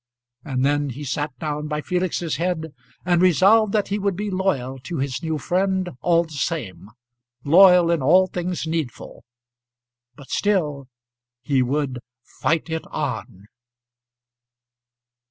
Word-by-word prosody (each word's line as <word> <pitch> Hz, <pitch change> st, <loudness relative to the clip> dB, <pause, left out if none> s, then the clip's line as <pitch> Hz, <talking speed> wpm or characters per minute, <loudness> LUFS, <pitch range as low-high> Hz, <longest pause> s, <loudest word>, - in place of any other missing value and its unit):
And 130 Hz, -2 st, -1 dB
then 145 Hz, 0 st, +1 dB
he 135 Hz, +4 st, -7 dB
sat 145 Hz, +2 st, -2 dB
down 150 Hz, +1 st, -4 dB
by 150 Hz, 0 st, -2 dB
Felix's 180 Hz, -1 st, -2 dB
head, 160 Hz, -3 st, -2 dB, 0.3 s
and 175 Hz, -1 st, +3 dB
resolved 195 Hz, +4 st, +5 dB
that 210 Hz, -3 st, +1 dB
he 205 Hz, +1 st, -1 dB
would 200 Hz, -2 st, 0 dB
be 205 Hz, +2 st, -3 dB
loyal 135 Hz, -9 st, -1 dB
to 160 Hz, +6 st, -6 dB
his 135 Hz, 0 st, -2 dB
new 160 Hz, -2 st, -2 dB
friend 185 Hz, +4 st, 0 dB
all 170 Hz, -1 st, +3 dB
the 160 Hz, -, -14 dB
same 140 Hz, -, -4 dB, 0.5 s
loyal 180 Hz, +2 st, +6 dB
in 170 Hz, -3 st, +1 dB
all 180 Hz, +8 st, +5 dB
things 180 Hz, -2 st, -4 dB
needful. 160 Hz, -5 st, -5 dB, 0.9 s
But 135 Hz, 0 st, -14 dB
still 150 Hz, -10 st, 0 dB, 0.6 s
he 135 Hz, 0 st, +1 dB
would 130 Hz, 0 st, -1 dB, 0.2 s
fight 160 Hz, +5 st, -1 dB
it 160 Hz, -1 st, -3 dB
on. 95 Hz, +2 st, -5 dB
160 Hz, 135 wpm, -22 LUFS, 140-185 Hz, 0.9 s, loyal